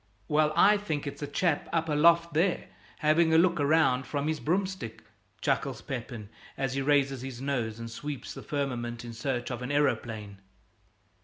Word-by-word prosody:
"Well, 150 Hz, -1 st, +3 dB
I 205 Hz, +5 st, +6 dB
think 160 Hz, -9 st, -3 dB
it's 140 Hz, -, -6 dB
a 145 Hz, -, -3 dB
chap 155 Hz, +1 st, 0 dB
up 165 Hz, -1 st, 0 dB
aloft 170 Hz, +2 st, +4 dB
there, 170 Hz, +4 st, +1 dB, 0.3 s
having 160 Hz, +1 st, +4 dB
a -, -, +7 dB
look 170 Hz, 0 st, +4 dB
round 140 Hz, -3 st, +3 dB
from 145 Hz, 0 st, -2 dB
his 155 Hz, -1 st, -1 dB
broomstick," 185 Hz, -, -2 dB, 0.4 s
chuckles -, -, -1 dB
Pepin, 120 Hz, -4 st, -6 dB, 0.3 s
as 135 Hz, -2 st, -1 dB
he 135 Hz, -, -1 dB
raises 135 Hz, -2 st, +2 dB
his 130 Hz, -2 st, -6 dB
nose 125 Hz, -5 st, -2 dB
and 115 Hz, 0 st, -6 dB
sweeps 145 Hz, +3 st, -6 dB
the -, -, -8 dB
firmament 120 Hz, -5 st, -3 dB
in 120 Hz, -, -7 dB
search 120 Hz, +1 st, -3 dB
of 120 Hz, 0 st, -4 dB
an 125 Hz, +2 st, -4 dB
aeroplane. 110 Hz, -8 st, -1 dB
145 Hz, 170 wpm, -29 LUFS, 125-160 Hz, 0.4 s, a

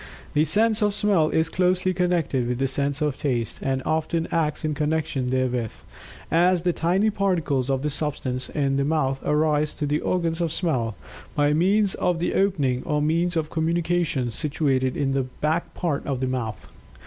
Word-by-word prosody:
The 150 Hz, +1 st, +3 dB
sense 220 Hz, +4 st, +2 dB
of 205 Hz, -1 st, +2 dB
Smell 195 Hz, -8 st, +2 dB
is 160 Hz, 0 st, +1 dB
closely 185 Hz, +1 st, +1 dB
connected 170 Hz, -8 st, 0 dB
with 125 Hz, 0 st, -1 dB
the 135 Hz, -, 0 dB
sense 140 Hz, +2 st, -1 dB
of 145 Hz, -2 st, -1 dB
Taste, 120 Hz, -6 st, -1 dB
and 130 Hz, -1 st, -1 dB
often 160 Hz, +1 st, 0 dB
acts 155 Hz, -1 st, 0 dB
in 155 Hz, -, 0 dB
connection 150 Hz, -3 st, -1 dB
therewith, 125 Hz, -3 st, 0 dB, 0.6 s
as 175 Hz, +1 st, +3 dB
the 175 Hz, -1 st, +2 dB
tiny 190 Hz, +7 st, +2 dB
particles 165 Hz, -10 st, 0 dB
of 135 Hz, 0 st, 0 dB
the 150 Hz, -, 0 dB
substance 140 Hz, -3 st, -2 dB
in 135 Hz, -2 st, 0 dB
the 140 Hz, -, +2 dB
mouth 140 Hz, -3 st, 0 dB
arise 150 Hz, 0 st, +1 dB
to 150 Hz, -, -2 dB
the 145 Hz, +1 st, 0 dB
organs 170 Hz, -2 st, -1 dB
of 165 Hz, -2 st, 0 dB
Smell, 125 Hz, -, -1 dB, 0.4 s
by 145 Hz, 0 st, +3 dB
means 195 Hz, +5 st, +3 dB
of 180 Hz, -2 st, 0 dB
the 170 Hz, -, -1 dB
opening 145 Hz, -11 st, +1 dB
or 150 Hz, -2 st, 0 dB
means 165 Hz, +3 st, +1 dB
of 155 Hz, -1 st, -2 dB
communication 165 Hz, -5 st, 0 dB
situated 135 Hz, -1 st, 0 dB
in 135 Hz, -1 st, 0 dB
the 135 Hz, 0 st, +1 dB, 0.2 s
back 160 Hz, +3 st, 0 dB
part 165 Hz, -6 st, -1 dB
of 135 Hz, -3 st, -1 dB
the 130 Hz, -, 0 dB
mouth. 120 Hz, -4 st, -4 dB
155 Hz, 180 wpm, -24 LUFS, 135-175 Hz, 0.6 s, The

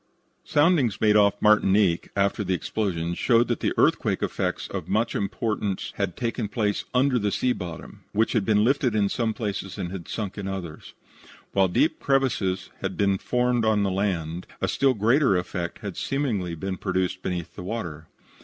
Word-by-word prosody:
Soundings 145 Hz, -, +2 dB
made 105 Hz, -1 st, +4 dB
off 100 Hz, -1 st, +4 dB
Martinique 100 Hz, -4 st, +4 dB
after 100 Hz, +1 st, +1 dB
the 95 Hz, -1 st, 0 dB
explosion 85 Hz, -4 st, -2 dB
showed 120 Hz, +5 st, +3 dB
that 120 Hz, -, -2 dB
earthquake -, -, +2 dB
effects -, -, -2 dB
of 95 Hz, -4 st, -5 dB
much 110 Hz, +4 st, +1 dB
importance 100 Hz, -1 st, -2 dB
had 100 Hz, -3 st, -2 dB
taken 115 Hz, -2 st, -2 dB
place 105 Hz, -1 st, -1 dB
under 130 Hz, 0 st, +3 dB
the 105 Hz, -1 st, 0 dB
sea 125 Hz, +4 st, +1 dB
bottom, 85 Hz, -6 st, -8 dB
which 110 Hz, +2 st, +1 dB
had 110 Hz, -, +2 dB
been 105 Hz, +1 st, +3 dB
lifted 130 Hz, -1 st, +2 dB
in 100 Hz, -2 st, +2 dB
some 115 Hz, +1 st, 0 dB
places 100 Hz, -3 st, -4 dB
and 90 Hz, -, -4 dB
had 95 Hz, -3 st, -7 dB
sunk 105 Hz, -2 st, -4 dB
in 100 Hz, -, -4 dB
others. 90 Hz, -5 st, -6 dB, 0.6 s
While 95 Hz, -1 st, +3 dB
deep 155 Hz, -, +1 dB
crevices 110 Hz, -9 st, 0 dB
had 95 Hz, -1 st, -3 dB
been 100 Hz, -2 st, +2 dB
formed 125 Hz, -1 st, +1 dB
on 110 Hz, -2 st, +3 dB
the 100 Hz, -, 0 dB
land, 90 Hz, -3 st, -2 dB
a -, -, 0 dB
still 135 Hz, -2 st, +2 dB
greater 115 Hz, 0 st, +3 dB
effect 90 Hz, -1 st, -4 dB
had 100 Hz, -, -4 dB
seemingly 110 Hz, -12 st, -1 dB
been 95 Hz, +3 st, -4 dB
produced 95 Hz, -1 st, -1 dB
beneath 90 Hz, -3 st, -4 dB
the -, -, -7 dB
water. 85 Hz, -6 st, -5 dB
100 Hz, 175 wpm, -25 LUFS, 95-115 Hz, 0.6 s, made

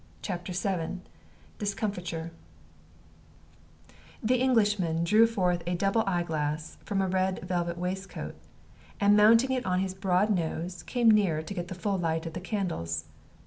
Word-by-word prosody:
CHAPTER 180 Hz, -2 st, -4 dB
VII 185 Hz, -1 st, -2 dB, 0.6 s
DISCOMFITURE 180 Hz, -5 st, -3 dB, 1.9 s
The 245 Hz, +3 st, +2 dB
Englishman 205 Hz, -10 st, +2 dB
drew 215 Hz, +6 st, +5 dB
forth 180 Hz, -6 st, 0 dB
a 175 Hz, -, 0 dB
double 195 Hz, +5 st, +2 dB
eyeglass 160 Hz, -4 st, -2 dB
from 195 Hz, -3 st, 0 dB
a -, -, 0 dB
red 185 Hz, 0 st, 0 dB
velvet 175 Hz, -1 st, -2 dB
waistcoat, 185 Hz, +2 st, -4 dB, 0.7 s
and 205 Hz, +1 st, +5 dB
mounting 225 Hz, +5 st, +6 dB
it 255 Hz, -1 st, 0 dB
on 180 Hz, -5 st, 0 dB
his 190 Hz, 0 st, -1 dB
broad 190 Hz, +2 st, +1 dB
nose, 175 Hz, -1 st, -2 dB
came 240 Hz, -3 st, +3 dB
nearer 185 Hz, -8 st, +3 dB
to 200 Hz, -, -6 dB
get 175 Hz, -2 st, -4 dB
the 185 Hz, -, -6 dB
full 195 Hz, +1 st, -1 dB
light 165 Hz, -1 st, -1 dB
of 165 Hz, -, -5 dB
the 175 Hz, -, -5 dB
candles. 165 Hz, -, -2 dB
185 Hz, 145 wpm, -28 LUFS, 170-205 Hz, 1.9 s, mounting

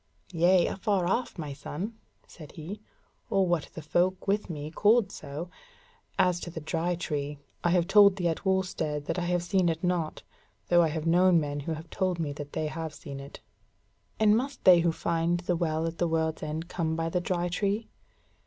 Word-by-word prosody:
"Yea, 175 Hz, +2 st, +4 dB
afar 195 Hz, -2 st, 0 dB
off, 235 Hz, +6 st, -1 dB
my 150 Hz, -4 st, -5 dB
son," 175 Hz, +9 st, -5 dB, 0.3 s
said 155 Hz, -3 st, -13 dB
he; 180 Hz, +7 st, -7 dB, 0.5 s
"or 195 Hz, -1 st, +3 dB
what 175 Hz, -4 st, 0 dB
the 160 Hz, -, -7 dB
folk 180 Hz, +4 st, +1 dB
with 205 Hz, 0 st, 0 dB
me 150 Hz, -2 st, -5 dB
called 210 Hz, +3 st, +3 dB
so; 150 Hz, +2 st, -6 dB, 0.7 s
as 180 Hz, -1 st, +3 dB
to 175 Hz, -, -6 dB
the 165 Hz, -, -6 dB
Dry 165 Hz, +3 st, -1 dB
Tree, 150 Hz, -4 st, -3 dB, 0.3 s
I 175 Hz, -, +3 dB
have 175 Hz, -1 st, +3 dB
told 200 Hz, 0 st, +7 dB
thee 180 Hz, -3 st, 0 dB
at 165 Hz, -, -2 dB
Wulstead 185 Hz, -6 st, -1 dB
that 180 Hz, -, -2 dB
I 175 Hz, -, -2 dB
have 175 Hz, 0 st, 0 dB
seen 185 Hz, -1 st, +2 dB
it 165 Hz, +1 st, -3 dB
not, 175 Hz, -3 st, -1 dB, 0.5 s
though 175 Hz, 0 st, +6 dB
I 165 Hz, -, +4 dB
have 155 Hz, 0 st, -3 dB
known 175 Hz, +1 st, +5 dB
men 145 Hz, -1 st, -3 dB
who 160 Hz, +3 st, -3 dB
have 160 Hz, +1 st, -8 dB
told 185 Hz, -2 st, 0 dB
me 155 Hz, -4 st, -2 dB
that 145 Hz, 0 st, -8 dB
they 155 Hz, -, -1 dB
have 155 Hz, 0 st, -4 dB
seen 140 Hz, -2 st, -8 dB
it." 140 Hz, +1 st, -10 dB, 0.8 s
"And 215 Hz, -1 st, +5 dB
must 270 Hz, +4 st, -2 dB
they 180 Hz, -2 st, +8 dB
who 170 Hz, 0 st, +2 dB
find 170 Hz, +1 st, 0 dB
the 180 Hz, 0 st, 0 dB
Well 160 Hz, -1 st, 0 dB
at 165 Hz, 0 st, -4 dB
the 175 Hz, -, +2 dB
World's 160 Hz, -1 st, 0 dB
End 155 Hz, +2 st, -4 dB
come 160 Hz, -3 st, -2 dB
by 165 Hz, 0 st, -1 dB
the 180 Hz, +1 st, 0 dB
Dry 175 Hz, 0 st, -1 dB
Tree?" 200 Hz, +5 st, -1 dB
170 Hz, 200 wpm, -28 LUFS, 160-185 Hz, 0.8 s, they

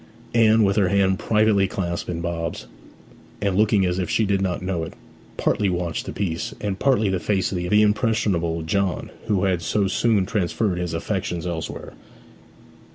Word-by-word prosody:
Anne, 110 Hz, -1 st, +5 dB
with 100 Hz, 0 st, +2 dB
her 100 Hz, -3 st, +4 dB
hand 95 Hz, -1 st, +2 dB
privately 105 Hz, -3 st, +3 dB
clasped 85 Hz, -3 st, -3 dB
in 85 Hz, -1 st, -3 dB
Bob's, 85 Hz, -1 st, -3 dB, 0.7 s
and 100 Hz, -2 st, 0 dB
looking 105 Hz, -1 st, +3 dB
as 90 Hz, +1 st, 0 dB
if 90 Hz, -, -2 dB
she 110 Hz, -, +2 dB
did 100 Hz, -1 st, +1 dB
not 90 Hz, -2 st, -1 dB
know 90 Hz, -3 st, -2 dB
it, -, -, -7 dB, 0.4 s
partly 100 Hz, -2 st, +1 dB
watched 90 Hz, -2 st, -2 dB
the -, -, -3 dB
piece 85 Hz, -5 st, -3 dB
and 100 Hz, -2 st, -3 dB
partly 125 Hz, -6 st, +2 dB
the 95 Hz, -1 st, 0 dB
face 95 Hz, 0 st, 0 dB
of 95 Hz, -, -2 dB
the 105 Hz, +5 st, +3 dB
impressionable 100 Hz, -6 st, +1 dB
John 95 Hz, +3 st, -1 dB, 0.2 s
who 100 Hz, -3 st, +1 dB
had 95 Hz, -3 st, +1 dB
so 100 Hz, +4 st, 0 dB
soon 100 Hz, 0 st, +2 dB
transferred 100 Hz, -2 st, -1 dB
his 85 Hz, -2 st, -3 dB
affections 90 Hz, -1 st, -3 dB
elsewhere. 85 Hz, -3 st, -5 dB
95 Hz, 170 wpm, -23 LUFS, 90-105 Hz, 0.7 s, Anne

